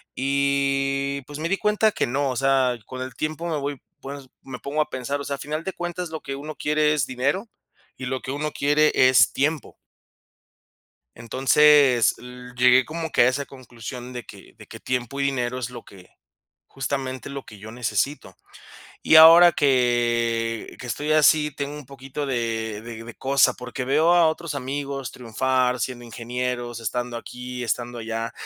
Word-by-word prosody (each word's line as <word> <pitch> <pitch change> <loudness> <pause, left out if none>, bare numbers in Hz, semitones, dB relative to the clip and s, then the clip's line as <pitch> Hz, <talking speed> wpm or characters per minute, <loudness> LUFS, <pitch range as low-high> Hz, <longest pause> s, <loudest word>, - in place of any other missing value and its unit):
Y 140 0 0
pues 145 +3 -9
me 165 +2 -2
di 195 - +1
cuenta 210 +1 +2
que - - -1
no, 135 +3 0
o 130 - -3
sea, 135 -1 +2
con 130 +2 -8
el 130 -1 -6
tiempo 155 +4 -3
me 160 -2 -1
voy 140 -2 -4 0.2
pues, 140 -1 -8
me 130 -2 -8
pongo 145 +4 -1
a 150 - -2
pensar, 130 +2 -3
o - - -5
sea, 140 - -2
a - - -13
final 155 +3 -4
de 190 - -4
cuentas, 175 0 -5
lo 160 -1 -6
que 135 - -5
uno 150 +2 -7
quiere 150 0 +1
es 145 -3 +1
dinero, 140 - -2 0.5
y 130 - -6
lo 130 0 -3
que 130 - -5
uno 150 +2 -3
quiere 150 +2 +2
es 130 -1 +5
tiempo. 150 +2 -1 1.4
Entonces, 130 +1 +4
l 125 0 -11
llegué 125 0 +5
como 160 +1 -5
que - - +3
a 120 - +5
esa 140 +2 -1
conclusión 125 -1 -9
de 120 -3 -7
que - - -14
de - - -14
que - - -11
tiempo 125 +1 -3
y - - +1
dinero 125 -2 -1
es 125 -1 -4
lo 120 -1 -9
que, 95 -3 -16 0.6
justamente 135 -1 -4
lo 140 -1 -7
que 105 - -13
yo 110 +2 -10
necesito. 120 +4 -2 0.7
Y - - +3
ahora 165 +2 +9
que 120 -4 +1
que - - -7
estoy 145 +5 -2
así, 155 0 +4
tengo 145 0 -4
un 150 -3 -10
poquito 135 +2 -6
de 115 -4 -2
de 115 -1 -8
de 120 0 -10
cosa, 135 -1 +3
porque 125 +1 -6
veo 155 +6 +3
a 175 -1 +5
otros 160 0 -2
amigos 140 0 -4
triunfar 125 +1 0
siendo 120 +1 -4
ingenieros, 120 0 -4
estando 120 +1 -3
aquí, 125 +1 -7
estando 120 +1 -3
allá. 115 0 -4
130 Hz, 180 wpm, -23 LUFS, 125-145 Hz, 1.4 s, ahora